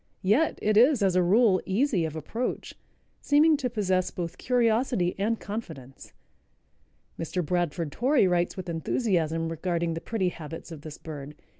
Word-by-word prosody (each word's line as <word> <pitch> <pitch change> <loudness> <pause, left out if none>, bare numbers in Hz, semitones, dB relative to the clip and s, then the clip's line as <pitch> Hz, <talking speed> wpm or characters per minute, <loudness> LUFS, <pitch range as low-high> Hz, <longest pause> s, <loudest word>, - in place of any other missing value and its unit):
Yet 215 +12 +2
it 210 0 +2
is, 250 -1 +5
as 190 -2 +2
a 185 - +4
rule, 195 +2 +4
easy 195 - +1
of 160 -1 -5
approach, 225 - -4 0.5
seeming 300 +2 +4
to 260 -3 -2
possess 190 -5 0
both 170 -2 -6
curiosity 235 -6 +1
and 220 +3 0
confidence. 160 - -8 1.1
Mr. 170 +1 -2
Bradford 170 -2 -1
Torrey 255 - +3
writes 175 0 0
with 185 - -6
enthusiasm 165 - -1
regarding 170 0 -2
the 165 - -5
pretty 200 -5 -1
habits 165 0 -9
of 155 -3 -8
this 150 0 -9
bird. 150 -2 -8
185 Hz, 150 wpm, -27 LUFS, 165-230 Hz, 1.1 s, is